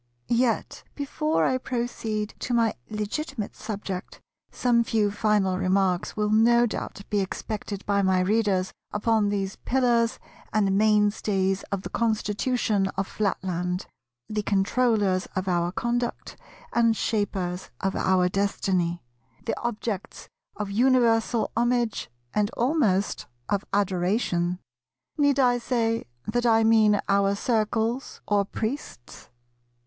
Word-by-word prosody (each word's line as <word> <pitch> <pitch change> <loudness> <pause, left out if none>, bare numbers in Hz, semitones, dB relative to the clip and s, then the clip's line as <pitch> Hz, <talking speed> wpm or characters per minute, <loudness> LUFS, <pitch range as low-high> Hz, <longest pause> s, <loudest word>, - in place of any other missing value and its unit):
Yet 240 0 +1
before 305 +2 0
I 255 0 +1
proceed 230 -4 -3
to 245 - -1
my 230 -2 +3 0.2
legitimate 215 +3 -4
subject 195 -4 -6 0.3
some 240 -2 +2
few 215 -3 +1
final 205 -3 +1
remarks 185 -1 +1
will 210 0 +1
no 235 +2 +5
doubt 205 -3 -5
be 205 - +2
expected 200 +1 -4
by 200 0 +2
my 190 -1 +3
Readers 195 -1 +1 0.2
upon 210 0 +2
these 195 -1 -2
pillars 240 -3 +1 0.3
and 200 -2 +2
mainstays 205 -2 +2
of 195 -1 -2
the - - -6
Constitution 215 -1 0
of 195 - 0
Flatland, 180 -3 -2 0.4
the 215 0 -2
controllers 205 -1 +1
of 190 0 -2
our 175 -1 +1
conduct 240 +4 -2 0.4
and 230 -2 +3
shapers 190 -5 -2
of 195 0 -1
our 185 -1 +3
destiny, 180 -3 0 0.4
the 230 - -1
objects 220 -4 -4 0.3
of 205 -2 -4
universal 235 0 +3
homage 240 - 0 0.2
and 210 -1 +1
almost 230 - +1 0.2
of 200 -1 0
adoration: 180 -2 0 0.6
need 285 -1 +4
I 245 -2 +4
say 230 -2 0 0.2
that 240 +3 0
I 225 -1 +5
mean 215 -2 +5
our 200 0 +3
Circles 225 +3 -1
or 205 -1 +2
Priests? 220 - -6
210 Hz, 120 wpm, -26 LUFS, 195-235 Hz, 0.6 s, no